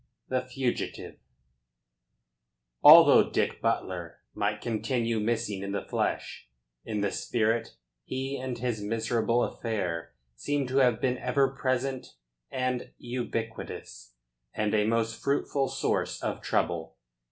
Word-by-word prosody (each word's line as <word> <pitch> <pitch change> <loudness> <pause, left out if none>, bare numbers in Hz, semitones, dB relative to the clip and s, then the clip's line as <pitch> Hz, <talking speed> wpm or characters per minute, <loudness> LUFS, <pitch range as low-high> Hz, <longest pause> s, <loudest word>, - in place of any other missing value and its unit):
THE 130 -1 +1
FUGITIVE 130 -1 -3 1.6
Although - - +9
Dick - - -1
Butler - - -2
might - - -1
continue 115 0 -1
missing 110 -2 -1
in 100 0 -4
the 100 - -3
flesh, - - -2 0.3
in 105 -2 -3
the 100 - 0
spirit 115 0 0 0.3
he 135 - -3
and 130 -2 -4
his 120 -3 -2
miserable 115 +2 +1
affair 90 -8 -3 0.2
seem 145 - -1
to 130 - 0
have 125 -4 +4
been 125 -1 0
ever 135 -1 +2
present 130 - -2 0.3
and 130 -1 -2
ubiquitous, 115 - -5 0.4
and 105 -1 0
a 105 -1 +3
most 115 0 0
fruitful 140 0 0
source - - -1
of - - -2
trouble. 80 -2 -1
115 Hz, 120 wpm, -28 LUFS, 105-130 Hz, 1.6 s, Although